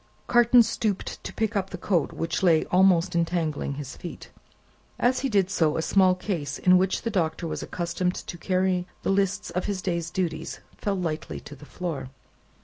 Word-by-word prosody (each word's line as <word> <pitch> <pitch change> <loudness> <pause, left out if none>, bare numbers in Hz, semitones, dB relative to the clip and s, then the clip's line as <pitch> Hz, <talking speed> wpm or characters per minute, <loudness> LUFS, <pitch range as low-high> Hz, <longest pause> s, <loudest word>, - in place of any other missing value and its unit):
Carton 240 0 +6
stooped 215 -3 -2
to - - -5
pick 225 0 -1
up 195 -1 0
the 180 - -6
coat, 180 -1 0
which 165 - -2
lay 165 -4 +4
almost 180 -1 +4
entangling 165 -4 -1
his 140 -2 -7
feet. 175 - -9 0.7
As 250 +2 +2
he 270 - -1
did 195 -4 +2
so, 160 -5 +2
a 160 - 0
small 185 0 +4
case 165 -8 -3
in 180 0 +5
which 190 0 0
the 230 - -1
Doctor 170 -3 -1
was 165 - -3
accustomed 180 +1 -2
to 175 - -7
carry 185 0 +1 0.2
the - - +1
lists 200 +1 0
of 180 - -2
his 200 -2 -2
day's 170 -2 -2
duties, 170 -3 -3 0.2
fell 200 -1 -2
lightly 165 -4 -3
on - - -7
the 150 - -12
floor. 155 -8 -4
180 Hz, 185 wpm, -26 LUFS, 165-195 Hz, 0.7 s, Carton